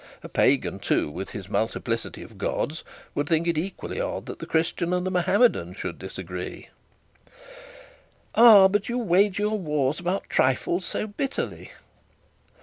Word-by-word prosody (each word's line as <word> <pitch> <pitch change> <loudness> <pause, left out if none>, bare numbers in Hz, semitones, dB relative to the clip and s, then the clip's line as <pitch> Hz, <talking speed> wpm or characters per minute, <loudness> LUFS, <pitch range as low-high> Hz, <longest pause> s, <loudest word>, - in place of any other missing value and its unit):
A - - -6
pagan, - - +2
too, 75 - 0
with 95 +5 -6
his 100 -5 -7
multiplicity 115 +2 -2
of - - -14
gods, 155 +3 -2 0.3
would 145 0 -2
think 165 0 +2
it 170 - +1
equally 190 - -4
odd - - -3
that - - -8
the - - -7
Christian 170 +2 0
and 180 0 0
the 185 - -1
Mahometan 180 - +2
should 90 -3 -5
disagree.' 90 -1 -7 1.6
'Ah! 220 -5 +9
But 205 +2 -1
you 240 - -1
wage 200 -3 +3
your 210 +1 0
wars 150 -4 0
about 180 +3 -2
trifles 150 +8 +1
so - - -2
bitterly.' 260 +6 -4
175 Hz, 145 wpm, -25 LUFS, 125-200 Hz, 1.6 s, Ah